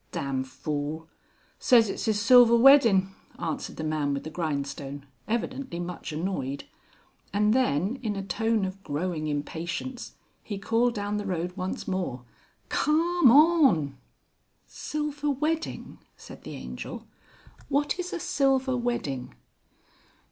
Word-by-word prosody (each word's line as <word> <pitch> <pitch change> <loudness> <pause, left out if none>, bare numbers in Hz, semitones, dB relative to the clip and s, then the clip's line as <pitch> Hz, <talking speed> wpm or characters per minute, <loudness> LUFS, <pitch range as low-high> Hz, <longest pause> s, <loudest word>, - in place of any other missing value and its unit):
"Dam 135 -1 -2
fool!... 150 +4 -4 0.5
say's 235 -3 +5
it's 195 - -4
'is 215 -2 +2
silver 235 +1 +7
weddin'," 230 -7 +6 0.3
answered 160 - -4
the 160 - -5
man 155 -2 0
with 140 - -5
the 155 - -7
grindstone, 140 -3 -4 0.2
evidently 235 -2 -3
much 175 -1 -5
annoyed; 150 -4 -3 0.7
and 210 +1 +2
then, 225 - +1
in 215 -4 -2
a 195 - -4
tone 220 +2 0
of 190 +1 -7
growing 155 0 -2
impatience, 165 - -4 0.3
he 205 - -6
called 230 +4 +1
down 205 0 -2
the 205 - -4
road 180 -1 -3
once 185 -1 -4
more; 175 -10 -3 0.4
"Carm 335 0 +3
on!" 275 - +5 0.7
"Silver 295 -1 -3
wedding!" 305 +4 -2 0.2
said - - -12
the - - -7
Angel. - - -7 0.6
"What 290 +4 0
is 360 0 -3
a - - -3
silver 270 -3 +1
wedding?" 195 - -3
200 Hz, 125 wpm, -27 LUFS, 155-260 Hz, 0.7 s, silver